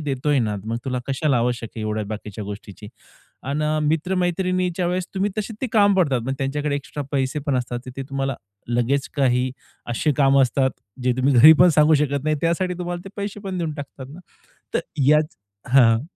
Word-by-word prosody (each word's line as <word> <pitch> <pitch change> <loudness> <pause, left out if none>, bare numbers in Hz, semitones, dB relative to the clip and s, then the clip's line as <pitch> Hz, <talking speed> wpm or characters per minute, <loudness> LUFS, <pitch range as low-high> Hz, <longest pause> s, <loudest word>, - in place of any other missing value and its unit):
देतोय 145 0 0
ना. 105 -4 0
मग 115 +1 -2
तुला 125 -1 -2
कशाला 140 0 +1
आवश्यक 120 -1 -1
आहे 110 - -4
एवढ्या 110 0 -2
बाकीच्या 105 -1 -6
गोष्टीची?" 105 0 -9 0.5
अन् 140 +3 -2 0.3
मित्र-मैत्रिणीच्या 180 +2 0
वेळेस, 180 0 -1
तुम्ही 195 +2 0
तसे 215 +1 -3
ते 260 - -1
काम 205 -2 +5
पडतात, 140 -9 +2
पण 135 - -1
त्यांच्याकडे 145 +1 -1
एक्स्ट्रा 145 +1 -6
पैसे 135 +1 0
पण 135 -3 +1
असतात, 125 -1 -2
तर - - -6
ते 135 - -3
तुम्हाला 135 -1 -1 0.3
लगेच 120 +3 0
काही 130 -2 +2 0.4
अशी 150 +5 +1
कामं 135 -1 +5
असतात, 130 +1 +2 0.3
जे 125 0 +2
तुम्ही 130 +1 +2
घरी 150 +7 +10
पण 180 - +8
सांगू 150 +1 +6
शकत 145 -1 0
नाही. 155 0 +1
त्यासाठी 180 +2 0
तुम्हाला 175 0 -4
ते - - -7
पैसे 200 0 -5
पण 190 -2 -4
देऊन 165 -3 -2
टाकतात 140 -2 -8
ना. 165 - -11 0.5
तर - - +2 0.3
याच 150 +3 +3 0.3
हां. 120 -3 +5
140 Hz, 185 wpm, -22 LUFS, 125-170 Hz, 0.5 s, घरी